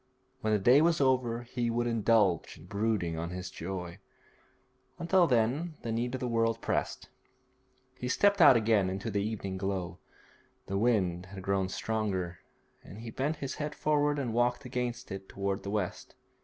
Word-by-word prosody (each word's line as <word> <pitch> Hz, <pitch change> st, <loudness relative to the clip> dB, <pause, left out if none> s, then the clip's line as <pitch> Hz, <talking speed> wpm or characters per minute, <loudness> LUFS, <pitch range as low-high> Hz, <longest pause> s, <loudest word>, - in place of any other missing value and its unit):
When 110 Hz, -, -1 dB
the 105 Hz, -, +4 dB
day 125 Hz, +8 st, +5 dB
was 165 Hz, 0 st, +3 dB
over 125 Hz, -3 st, +1 dB
he 120 Hz, 0 st, -2 dB
would 120 Hz, +1 st, 0 dB
indulge 110 Hz, -6 st, +2 dB
in 80 Hz, -, -14 dB
brooding 100 Hz, -4 st, -1 dB
on 85 Hz, +1 st, -3 dB
his 90 Hz, 0 st, -6 dB
joy; 90 Hz, +1 st, -6 dB, 1.0 s
until 175 Hz, +1 st, +3 dB
then 135 Hz, +7 st, +1 dB
the 115 Hz, -, -3 dB
need 120 Hz, +3 st, -1 dB
of -, -, -4 dB
the 125 Hz, -, -1 dB
world 115 Hz, -1 st, +1 dB
pressed. -, -, -2 dB, 0.9 s
He 125 Hz, -, -3 dB
stepped 200 Hz, +8 st, +3 dB
out 130 Hz, -6 st, +9 dB
again 110 Hz, -4 st, +2 dB
into 95 Hz, +4 st, -4 dB
the 100 Hz, 0 st, 0 dB
evening 100 Hz, -3 st, -4 dB
glow. 95 Hz, -2 st, -3 dB, 0.7 s
The 100 Hz, +1 st, -2 dB
wind 95 Hz, -6 st, +1 dB
had 95 Hz, 0 st, -9 dB
grown 95 Hz, -1 st, 0 dB
stronger, 95 Hz, -5 st, -2 dB, 0.4 s
and 100 Hz, -, -11 dB
he 115 Hz, -1 st, -7 dB
bent 140 Hz, +7 st, -1 dB
his 140 Hz, -3 st, -5 dB
head 150 Hz, 0 st, -3 dB
forward 145 Hz, -1 st, +1 dB
and 125 Hz, -5 st, -2 dB
walked 120 Hz, +2 st, +1 dB
against 125 Hz, -1 st, -3 dB
it 95 Hz, 0 st, -7 dB
towards 100 Hz, 0 st, -2 dB
the 100 Hz, -, -6 dB
west. 100 Hz, -3 st, -3 dB
115 Hz, 170 wpm, -30 LUFS, 95-125 Hz, 1.0 s, out